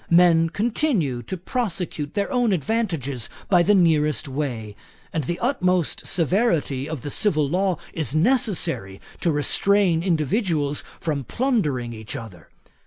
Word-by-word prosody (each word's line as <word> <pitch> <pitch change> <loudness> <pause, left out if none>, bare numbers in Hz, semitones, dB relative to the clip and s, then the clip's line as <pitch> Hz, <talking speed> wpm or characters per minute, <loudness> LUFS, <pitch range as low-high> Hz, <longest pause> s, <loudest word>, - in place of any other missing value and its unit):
Men 170 -1 +5
continue 205 - 0
to 155 +11 -5
prosecute 180 - -3
their 200 -1 -1
own 245 -5 +2
advantages 165 - -1 0.2
by 180 -3 +5
the 205 +4 +4
nearest 155 - +2
way; 125 -7 -4 0.4
and 155 -4 -1
the 175 +5 -2
utmost 185 - 0
severity 165 - +1
of 155 -5 -4
the 145 - -5
civil 155 -7 +1
law 185 +3 +1 0.2
is 155 -3 -2
necessary 170 - 0 0.2
to 170 - +1
restrain 175 +4 +2
individuals 160 - 0 0.2
from 150 -4 -2
plundering 150 - -1
each 110 +3 -7
other. 110 -10 -9
165 Hz, 130 wpm, -23 LUFS, 140-195 Hz, 0.4 s, Men